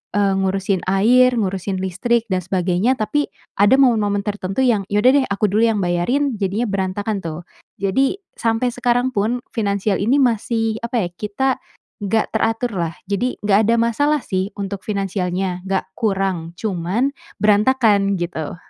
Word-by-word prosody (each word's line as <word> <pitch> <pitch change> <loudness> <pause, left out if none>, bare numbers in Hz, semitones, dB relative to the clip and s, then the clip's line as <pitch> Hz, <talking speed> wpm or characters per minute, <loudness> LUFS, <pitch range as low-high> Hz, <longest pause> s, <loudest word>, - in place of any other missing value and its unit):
eee, 200 -1 +2
ngurusin 195 0 0
air, 245 +6 +4
ngurusin 190 -1 -2
listrik, 220 +6 0
dan 185 -3 -1
sebagainya," 185 +7 0
tapi 290 +7 -1 0.2
ada 205 +6 +5
momen-momen 215 -6 +3
tertentu 200 0 -3
yang, 230 -6 +2
"Ya 205 - +2
udah 255 - +7
deh - - -2
aku 200 +1 +1
dulu 215 +3 +3
yang 220 -2 +1
bayarin." 230 +10 0
Jadinya 205 +4 -1
berantakan 200 +1 -2
tuh. 160 -1 -5 0.4
Jadi 265 - +1 0.2
sampai 225 +2 0
sekarang 245 +1 0
pun 220 +5 0 0.2
finansial 200 -2 0
ini 245 +8 +3
masih, 225 -3 +1
apa 235 -5 -1
ya, - - -12
kita 215 +7 -1 0.5
enggak 215 +2 0
teraturlah. 220 -7 -1 0.2
Jadi 245 +6 0
enggak 205 -1 +4
ada 230 - +4
masalah 285 +6 +1
sih 190 +2 -2
untuk 200 -1 -4
finansialnya, 190 -2 -2
enggak 190 -1 0 0.2
kurang 190 -6 -1
cuman 200 +7 -1 0.3
berantakan, 210 -2 +3
gitu. 170 -3 -4
205 Hz, 150 wpm, -20 LUFS, 190-235 Hz, 0.5 s, udah